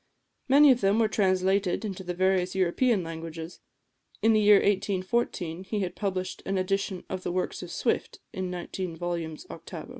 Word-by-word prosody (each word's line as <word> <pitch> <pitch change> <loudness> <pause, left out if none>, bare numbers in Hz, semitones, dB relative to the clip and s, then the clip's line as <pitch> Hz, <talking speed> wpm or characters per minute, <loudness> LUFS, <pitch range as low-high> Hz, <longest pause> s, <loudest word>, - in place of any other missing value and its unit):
Many 280 +2 +7
of 250 - +2
them 195 +2 +3
were 225 -1 +4
translated 190 0 +1
into 195 -2 -5
the 180 -1 -4
various 185 0 +1
European 190 +3 +2
languages. 165 0 -7 0.6
In 225 0 +5
the 215 - +4
year 210 0 +7
1814 190 -3 0
he 210 +1 -2
had 180 -2 -2
published 190 -3 -3
an 195 - -1
edition 190 0 -1
of 185 - -4
the 175 - -3
works 185 +1 -2
of - - -7
Swift, - - -1
in 185 -1 -3
nineteen 180 0 -5
volumes 165 -2 -4
octavo. 165 +4 -9
185 Hz, 170 wpm, -27 LUFS, 175-200 Hz, 0.6 s, Many